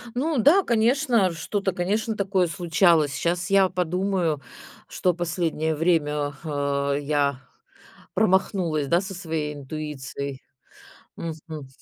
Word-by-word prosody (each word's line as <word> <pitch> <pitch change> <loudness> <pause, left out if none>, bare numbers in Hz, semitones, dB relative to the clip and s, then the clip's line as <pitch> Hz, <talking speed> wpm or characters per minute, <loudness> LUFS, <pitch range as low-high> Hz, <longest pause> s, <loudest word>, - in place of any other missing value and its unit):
Ну 295 +3 0
да, 305 - +5
конечно, 235 - +2
что-то, 195 +4 -2
конечно, 210 +5 -1
такое 195 -3 +1
случалось. 165 -3 +3
Щас 175 +6 -1
я 195 -1 +5
подумаю, 180 -3 0 0.5
что 180 - 0
последнее 165 -2 -1
время, 150 -3 +1
а, 140 -2 -1
я 140 -2 0 0.7
промахнулась, 185 -7 +1
да, 170 +3 +3
со 195 0 -6
своей 160 -4 -3
интуицией. 140 -2 -6 0.7
Мгм. 155 -3 -7
170 Hz, 105 wpm, -24 LUFS, 150-195 Hz, 0.7 s, да